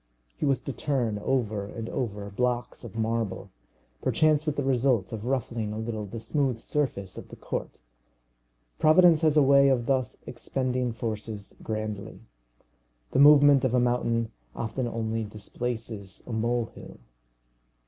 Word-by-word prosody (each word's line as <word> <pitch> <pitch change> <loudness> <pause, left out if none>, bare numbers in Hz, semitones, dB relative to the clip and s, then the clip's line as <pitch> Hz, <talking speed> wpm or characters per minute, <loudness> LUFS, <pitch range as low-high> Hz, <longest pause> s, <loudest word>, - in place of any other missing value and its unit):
He - - -1
was 135 -2 +1
to 140 - -4
turn 120 -8 -1
over 110 -4 0
and 110 +3 -6
over 105 -6 -3
blocks 125 +4 -1
of 115 -4 -9
marble, 110 -3 -2 0.5
perchance 155 0 +2
with 150 - 0
the 145 - -1
result 125 -7 +1
of 110 0 -5
ruffling 120 -4 -1
a 105 - -4
little 110 -2 -4
the 115 +4 -6
smooth 135 0 0
surface 115 -7 -2
of - - -12
the - - -10
court! - - -5 1.0
Providence 165 0 +6
has 155 -2 +3
a 150 - +7
way 140 0 +6
of 125 -3 +2
thus 130 -2 -1
expending 125 0 -2
forces 110 -2 -5
grandly. 110 -1 -4 0.9
The - - +1
movement 145 -1 +7
of 130 -1 +2
a - - +4
mountain 115 -2 +1 0.2
often 120 +2 -2
only 115 -1 -2
displaces 110 -1 -6
a 120 - -6
molehill. 115 +1 -2
120 Hz, 145 wpm, -27 LUFS, 110-135 Hz, 1.0 s, a